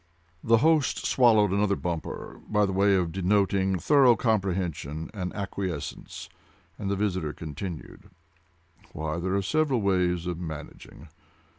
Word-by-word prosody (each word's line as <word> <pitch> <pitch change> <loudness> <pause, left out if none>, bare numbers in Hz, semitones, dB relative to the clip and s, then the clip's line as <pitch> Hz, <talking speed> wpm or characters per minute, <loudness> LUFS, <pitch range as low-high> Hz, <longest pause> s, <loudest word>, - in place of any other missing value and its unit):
The 115 0 +5
host 160 -4 +2
swallowed 110 -6 +4
another 100 0 +2
bumper, 85 -3 -5
by 105 -1 +3
way 100 +1 +3
of 90 -3 0
denoting 95 +1 +1
thorough 135 - +5
comprehension 90 - -2
and 90 -4 -4
acquiescence, 95 -6 -5 0.5
and 100 - -3
the 100 - 0
visitor 95 -7 -1
continued. 85 +4 -8 0.8
"Why, 80 +2 -3
there 95 +2 -1
are 100 - 0
several 145 +3 +1
ways 90 -3 +1
of 90 -1 -3
managing. 80 -1 -9
95 Hz, 125 wpm, -27 LUFS, 85-105 Hz, 0.8 s, The